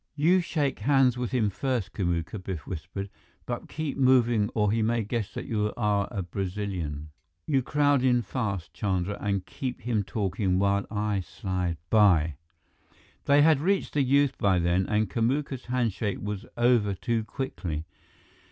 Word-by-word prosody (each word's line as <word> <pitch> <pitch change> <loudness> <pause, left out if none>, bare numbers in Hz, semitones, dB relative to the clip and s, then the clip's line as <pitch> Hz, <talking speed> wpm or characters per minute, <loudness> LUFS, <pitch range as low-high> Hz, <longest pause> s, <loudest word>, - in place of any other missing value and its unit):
"You 165 +6 +4
shake 145 -5 -1
hands 135 -3 +3
with 125 -1 -2
him 115 -5 +1
first, 125 -2 -2
Kamuka," 90 +1 -2
Biff 90 -6 -5
whispered, 90 +3 -5 0.4
"but - - -5
keep 155 -2 -4
moving 120 -5 +4
or 105 -2 +2
he 115 +1 +1
may 115 +1 +1
guess 105 -1 -3
that - - -4
you 105 -2 -1
are 105 -3 +1
a 100 - -3
Brazilian. 90 -5 -4 0.3
You 135 -3 +2
crowd 145 +1 +2
in 125 -2 +3
fast, 100 -6 -3
Chandra, 95 -1 -1
and 100 -2 -1
keep 130 -2 -5
him 115 -2 0
talking 95 -2 -1
while 100 +1 +1
I 105 -1 -1
slide 90 -2 -3
by 90 -8 +5 0.4
" - - -32
They 145 +1 +6
had 155 -2 +5
reached 195 +4 0
the 145 - +2
youth 140 +1 +3
by 95 -2 +3
then, 85 +2 +1
and 105 0 +1
Kamuka's 130 +5 -1
handshake 115 -4 -1
was 105 -1 -5
over 120 -5 +3
too 115 +2 -1
quickly. 90 - -4
105 Hz, 160 wpm, -27 LUFS, 95-130 Hz, 0.4 s, They